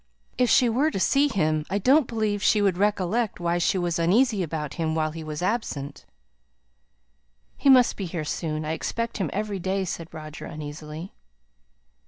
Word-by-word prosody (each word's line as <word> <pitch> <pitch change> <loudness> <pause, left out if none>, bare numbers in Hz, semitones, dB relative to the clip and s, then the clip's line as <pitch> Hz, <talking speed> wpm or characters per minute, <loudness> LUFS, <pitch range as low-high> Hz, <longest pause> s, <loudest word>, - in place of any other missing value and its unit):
If 250 -1 +2
she 250 - +5
were 260 +7 +2
to 250 - -3
see 280 +9 +3
him, 155 - 0
I 195 - 0
don't 265 +7 +4
believe 215 -3 -1
she 210 - +3
would 195 -3 +2
recollect 205 +2 0
why 175 0 0
she 175 - +1
was 175 -2 -1
uneasy 210 +5 +3
about 155 -4 -3
him 160 -2 -1
while 155 -1 0
he 160 0 -7
was 155 +2 -5
absent." 180 - -3 1.5
"He 280 - +2
must 255 -2 +6
be 195 - -4
here 165 -2 -4
soon. 155 0 -3
I 155 - -2
expect 230 +8 -3
him 190 -7 -1
every 205 -1 -3
day," 190 +1 -1
said 165 -2 -6
Roger, 155 -1 -8
uneasily. 150 +3 -8
185 Hz, 175 wpm, -25 LUFS, 160-215 Hz, 1.5 s, must